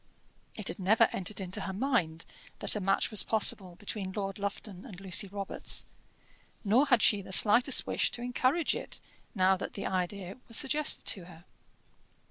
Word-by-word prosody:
It - - -4
had - - -4
never 195 +4 +3
entered 200 +3 -3
into 185 -1 -4
her 190 - -5
mind 190 - -1 0.3
that - - -3
a - - -2
match 195 +3 0
was 215 - +5
possible 195 -4 +3
between 195 0 -6
Lord 195 0 -5
Lufton 200 -1 -6
and 200 -9 -11
Lucy 195 0 0
Robarts, 200 0 -2 0.8
nor 235 +8 +2
had 245 -5 +3
she 205 -2 +4
the 190 - -12
slightest 235 +7 +4
wish - - 0
to 240 - -6
encourage 255 +6 0
it - - -6 0.4
now 190 -1 +3
that - - -7
the 200 - -6
idea 185 +2 -4
was 230 - +4
suggested 295 +1 +3
to 185 -4 +1
her. 170 -1 -16
200 Hz, 170 wpm, -29 LUFS, 185-230 Hz, 0.8 s, was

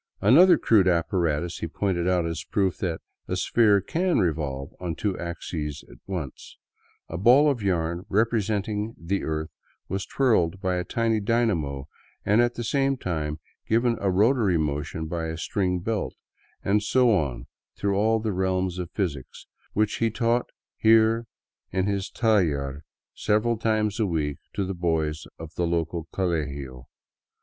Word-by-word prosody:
Another 165 - +7
crude 105 -5 +4
apparatus 85 -1 0
he - - -3
pointed 90 0 -1
out 90 -2 +2
as 85 -1 -3
a - - -35
proof 95 -3 +1
that 85 -4 -2 0.2
" - - -52
a - - -1
sphere 105 -4 +3
can 175 - 0
revolve 75 -7 -1
on 85 -3 -3
two 100 +2 -1
axes 80 -3 -5
at - - -15
once," 85 -9 -6 0.3
— - - -37
a 85 - -5
ball 135 +8 +6
of 125 -5 -3
yarn 85 -1 -1
representing 110 0 0
the 90 +4 -2
earth 80 0 -3 0.4
was 95 +1 -3
twirled 95 -10 +2
by 95 -2 -1
a 90 - -1
tiny 115 +2 0
dynamo, 95 - 0 0.4
and 105 +3 +4
at 120 0 +1
the 120 - -4
same 135 +3 +1
time 75 -7 -3 0.3
given 115 +1 +3
a 100 - +1
rotary 105 -1 +3
mo 75 -2 0
tion 80 +2 -5
by 80 0 -3
a 80 0 -4
string 90 0 -1
belt 110 +2 -2 0.3
— - - -36
and 105 +2 +3
so 125 +3 +3
on 65 -9 -2 0.3
through 100 -1 0
all 110 +3 +2
the 110 -2 -2
realms 95 -1 0
of 90 -2 -4
physics, 80 - -4 0.3
which 105 0 +1
he 115 - +1
taught 120 +2 0 0.3
here 115 +1 +4 0.4
in 95 0 0
his 100 0 -1
taller 75 - +1 0.3
several 110 +3 +1
times 110 -1 0
a 110 - +2
week 75 -5 -2 0.2
to 100 - 0
the 95 - -3
boys 80 -3 -1
of 80 0 -9
the 85 0 -1
local 85 -1 -2
colegio. 70 -8 -3
95 Hz, 165 wpm, -25 LUFS, 80-110 Hz, 0.4 s, Another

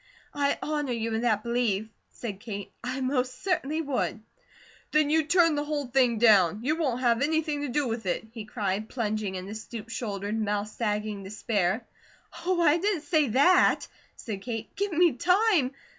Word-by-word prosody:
"I 285 0 +1
honour 295 -4 -1
you 230 -1 -2
in 220 - 0
that 215 -3 +1
belief," 235 -4 0 0.2
said 205 -5 -7
Kate. 205 -3 -6
"I 255 +2 -3
most 255 -1 -1
certainly 325 -4 0
would." 270 -5 -1 0.7
"Then 305 -1 +3
you 320 +1 +4
turn 330 0 +4
the 290 0 -1
whole 295 -1 -2
thing 250 -2 +2
down? 210 -4 +5
You 300 +4 +1
won't 265 -7 -1
have 235 -1 +2
anything 300 0 0
to 290 - -2
do 275 +2 0
with 225 -3 -4
it?" 180 - -1
he 225 -2 -7
cried, 210 -1 -2
plunging 215 -5 -2
into 185 +3 -6
stoop 220 0 -8
shouldered, 215 -1 -3
mouth 210 0 -1
sagging 210 -2 -2
despair. 205 +1 -1 0.6
"Oh, 370 -1 +2
I 315 +1 +4
didn't 385 -4 0
SAY 310 -2 +2
that!" 280 +11 +4 0.3
said 205 -4 -6
Kate. 225 0 -6
"Give 405 0 -1
me 340 -1 +4
time! 360 - +3
245 Hz, 175 wpm, -27 LUFS, 215-295 Hz, 0.7 s, down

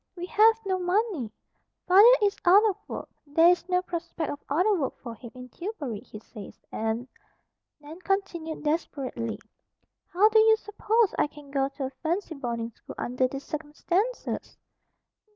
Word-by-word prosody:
We 355 -1 -5
have 440 +4 +5
no 375 -1 0
money. 360 - 0 0.6
Father 395 +6 +8
is 405 -1 +2
out 400 +5 +6
of 405 - 0
work. - - -6 0.2
There 325 +4 +5
is 355 0 +1
no 360 0 +2
prospect 340 -2 -4
of 290 - -8
other 360 +9 +3
work 300 -9 -2
for 235 -3 -8
him 235 +1 -11
in 250 0 -10
Tillbury, 300 - -5
he 220 - -11
says, 210 -1 -11
and," 225 +3 -2 0.7
Nan 300 +3 -11
continued 370 -5 -2
desperately, 275 -7 -2 0.7
"how 390 +4 +4
do 440 0 +5
you 440 0 +6
suppose 425 +1 +1
I - - +3
can 290 -1 -14
go 275 -1 +1
to 275 0 -7
a - - -3
fancy 340 +2 -2
boarding 235 -5 -4
school - - -12
under 250 +1 0
these 275 +2 -7
circumstances?" 340 +10 -3
330 Hz, 160 wpm, -27 LUFS, 270-390 Hz, 0.7 s, Father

